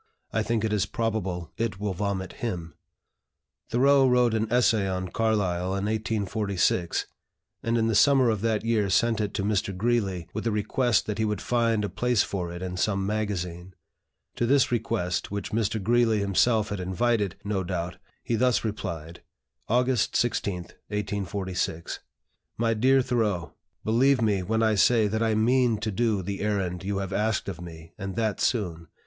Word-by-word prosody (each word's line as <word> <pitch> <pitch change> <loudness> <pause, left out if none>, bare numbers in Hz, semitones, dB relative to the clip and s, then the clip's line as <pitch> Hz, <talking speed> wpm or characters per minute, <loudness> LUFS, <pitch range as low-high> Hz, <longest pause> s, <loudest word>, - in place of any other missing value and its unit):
I 110 - +2
think 115 0 0
it 110 - -1
is 105 -3 +1
probable 95 - -2
it 110 -4 -2
will 105 -2 -2
vomit 95 0 -3
him." 90 -8 -3 1.0
Thoreau 135 +3 +4
wrote 125 -2 +3
an 110 0 -1
essay 115 -5 +3
on 95 0 -3
Carlyle 95 -5 0
in 100 +1 -2
1846, 105 -4 0 0.6
and 115 +1 0
in 115 - +2
the 115 - +1
summer 130 +2 +5
of 110 -3 -2
that 110 -1 0
year 110 -3 +1
sent 115 +2 +2
it 105 -1 -1
to 100 - -1
Mr. 100 -2 -1
Greeley, 100 -6 0
with 110 +2 -3
a - - +2
request 105 +2 +1
that 105 0 -4
he - - +2
would 105 -1 -1
find 115 -3 +1
a - - -1
place 120 0 +1
for 90 -3 -4
it 90 +1 -6
in 90 0 -4
some 95 0 0
magazine. 95 -4 -3 0.6
To 120 - +1
this 135 0 +3
request, 105 -6 -1
which 100 0 -4
Mr. 110 0 0
Greeley 115 +2 +3
himself 105 +2 +2
had 105 -2 -3
invited, 100 +2 0
no 100 -2 -1
doubt, 90 -1 -3 0.3
he - - -2
thus 125 +2 +2
replied: 85 -6 -5 0.5
"August 125 0 +1
16, 105 -5 +1 0.3
1846. 100 -4 -3 0.6
"MY 115 0 +2
DEAR 130 +4 +4
THOREAU, 110 -9 -1 0.3
Believe 130 +4 +3
me 105 -4 +2
when 110 +4 0
I 110 -1 +3
say 110 +1 +4
that 110 +2 -1
I 110 -1 +2
mean 120 +1 +3
to 110 +1 -3
do 105 -2 0
the 100 +2 -4
errand 95 -4 -1
you 100 +1 -2
have 95 0 -3
asked 105 +1 0
of 90 -3 -5
me, 80 -2 -10
and 95 -1 -5
that 110 -2 -1
soon. 85 -8 -1
105 Hz, 170 wpm, -26 LUFS, 95-115 Hz, 1.0 s, summer